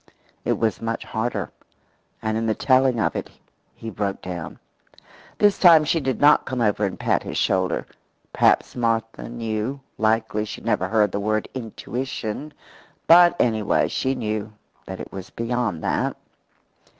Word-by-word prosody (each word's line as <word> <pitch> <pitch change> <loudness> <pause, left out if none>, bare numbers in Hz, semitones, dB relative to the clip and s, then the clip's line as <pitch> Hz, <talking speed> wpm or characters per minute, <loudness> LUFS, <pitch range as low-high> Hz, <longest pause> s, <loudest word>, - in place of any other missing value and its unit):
It - - +1
was 110 -5 -1
much 115 0 -3
harder; 110 -4 -3 0.7
and 110 0 -1
in 115 0 -1
the 110 - +1
telling 130 -2 +3
of - - 0
it - - -4 0.5
he 115 - -7
broke 100 -1 -2
down. 90 -3 -6 0.8
This 205 -1 +3
time 165 -4 +7
she 165 +2 +1
did 130 -5 -2
not 150 +1 +5
come 130 - -3
over 105 -2 +2
and 95 - -4
pat - - +1
his - - -5
shoulder. 95 -2 +1 0.5
Perhaps - - +3
Martha 115 -2 -1
knew 115 +2 -3 0.2
likely 110 -1 +1
she 110 - -7
had - - -15
never - - +1
heard 105 -3 +2
the 100 - -2
word 110 +1 -1
intuition, 125 +2 -5 0.5
but, 175 +1 +7
anyway, 110 -3 +2
she 135 0 -1
knew 110 -3 -3 0.4
that 95 0 -6
it - - -8
was 95 -1 -8
beyond 115 -7 -2
that. - - -1
115 Hz, 155 wpm, -23 LUFS, 105-130 Hz, 0.8 s, time